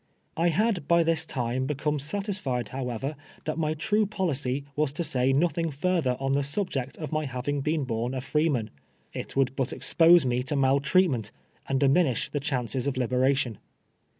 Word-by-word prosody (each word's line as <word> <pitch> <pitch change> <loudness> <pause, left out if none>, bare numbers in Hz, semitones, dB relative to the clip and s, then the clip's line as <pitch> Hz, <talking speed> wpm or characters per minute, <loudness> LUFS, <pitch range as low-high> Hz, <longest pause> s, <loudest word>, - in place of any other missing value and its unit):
I 170 +1 +2
had 205 +1 +1
hy 170 0 +5
this 165 0 +1
time 125 0 -2
hecomo 150 0 -1
satisfied, 150 - -3
however, 130 +2 -3 0.3
that 155 +1 -2
my 155 -1 0
true 210 +7 +1
policy 145 -9 -1
was 150 -2 +1
to 170 - -2
say 135 -4 +1
no 145 +6 +4
thing 165 -1 -2
further 150 -3 0
on 135 0 -1
the 140 - +3
suhject 140 -3 -2
of 155 -4 -6
my 155 -1 -1
has'ing 135 +2 -2
Leen 150 -2 0
horn 120 +2 -2
a 130 - -2
freeman. 135 -4 0 0.4
It - - -6
would 135 -1 +1
but 135 -3 -1
expose 170 -2 +5
me 125 0 +1
to 130 +3 -2
mal 135 0 +3
treatmeut, 140 - +2 0.4
and 135 -1 +1
diminish 140 -2 +2
the 145 - -1
ciumces 130 -3 -2
of 140 - -1
liberation. 130 -2 +1
140 Hz, 175 wpm, -27 LUFS, 130-160 Hz, 0.4 s, hy